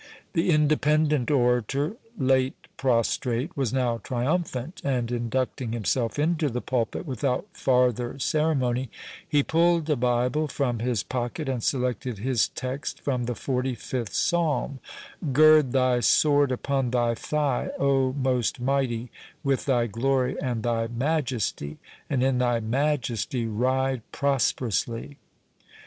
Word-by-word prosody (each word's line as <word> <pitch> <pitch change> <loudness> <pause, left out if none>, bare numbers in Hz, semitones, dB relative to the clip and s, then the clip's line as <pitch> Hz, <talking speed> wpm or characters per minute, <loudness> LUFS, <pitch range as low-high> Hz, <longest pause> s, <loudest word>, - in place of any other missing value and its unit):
The 170 0 +1
Independent 150 -2 +2
orator, 135 - +1 0.2
late 130 -2 +2 0.2
prostrate, 125 +3 0
was 135 -5 -1
now 125 -3 0
triumphant, 130 - -2
and 125 -4 -1
inducting 120 0 -2
himself 115 +2 -1
into 155 0 +1
the 125 0 -2
pulpit 120 +4 -2
without 130 - -1
farther 125 -1 +1
ceremony, 135 -4 0 0.4
he 145 -2 +3
pulled 170 0 +2
a - - +4
Bible 125 +4 +1
from 125 -5 -1
his 120 -3 0
pocket, 125 +4 -3
and 130 -3 -1
selected 125 -1 -1
his 120 +1 +1
text 130 +2 -5
from 125 -4 -1
the 120 0 -2
forty 130 0 -2
fifth 120 -1 -4
psalm,—"Gird 155 -2 +2
thy 130 -1 +3
sword 145 +2 +4
upon 135 0 -1
thy 120 -1 +1
thigh, 145 +2 -1
O 135 -2 +2
most 130 -3 0
mighty, 125 -3 -1 0.3
with 135 -1 0
thy 125 -4 +2
glory 130 +3 0
and 120 -4 -2
thy 115 -1 0
majesty: 120 - -2 0.3
and 130 -3 +1
in 130 -1 +2
thy 120 -2 +2
majesty 120 -1 -1
ride 130 +3 0
prosperously." 130 -2 -1
130 Hz, 125 wpm, -26 LUFS, 120-140 Hz, 0.4 s, a